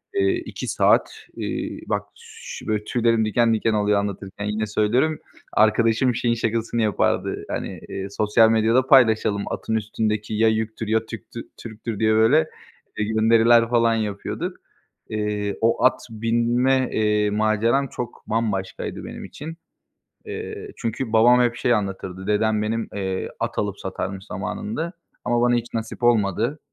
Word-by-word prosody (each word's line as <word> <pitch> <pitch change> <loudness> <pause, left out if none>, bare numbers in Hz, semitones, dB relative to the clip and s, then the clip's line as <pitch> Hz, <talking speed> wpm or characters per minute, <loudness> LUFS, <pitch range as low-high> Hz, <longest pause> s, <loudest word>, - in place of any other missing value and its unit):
eee, 380 -1 +3
2 - - -6
saat, - - +3 0.2
eee, - - -4
bak, - - -1
ş 460 0 -10
böyle 105 -1 0
tüylerim 115 -1 +1
diken 115 +2 +2
diken 110 0 +1
oluyor 105 -1 +2
anlatırken 100 0 -5
yine 105 +1 -1
söylüyorum; 120 +9 +1 0.3
arkadaşım 115 +3 +3
şeyin 120 0 +1
şakasını 115 +1 -1
yapardı, 105 -4 0
hani, - - -4
eee, 95 0 -4
sosyal 110 +2 +3
medyada 115 +4 +3
paylaşalım 110 -6 +4
"Atın 110 - -2
üstündeki 110 0 -2
ya 110 +1 +3
yüktür 110 0 -2
ya 110 +1 +1
Türk'tü 115 +1 -8 0.2
Türk'tür." 110 -1 -6
diye, 110 0 +3
böyle, 145 +9 +4 0.5
gönderiler 115 +2 +4
falan 115 -1 +3
yapıyorduk. 105 -2 -3 0.5
Eee, 105 -1 -2
o 115 +1 +2
at 130 - +4
binme, 120 +4 +1
eee, 105 -1 +2
maceram 110 +6 +1
çok 120 -1 -7
bambaşkaydı 105 -4 -2
benim - - -8
için. 160 +3 -8 0.7
Eee, - - -6
çünkü 115 +1 -3
babam 120 +3 +6
hep 120 -1 +2
şey 120 0 +1
anlatırdı; 95 -2 -3
dedem 105 0 +2
benim, 110 +1 -2
eee, 95 -2 -3
at - - -3
alıp 100 -1 -2
satarmış 95 0 -5
zamanında 170 - -4 0.3
ama 120 -1 +1
bana 120 0 +3
hiç 120 0 -3
nasip 115 +2 -5
olmadı. 115 - +2
110 Hz, 140 wpm, -23 LUFS, 105-120 Hz, 0.7 s, babam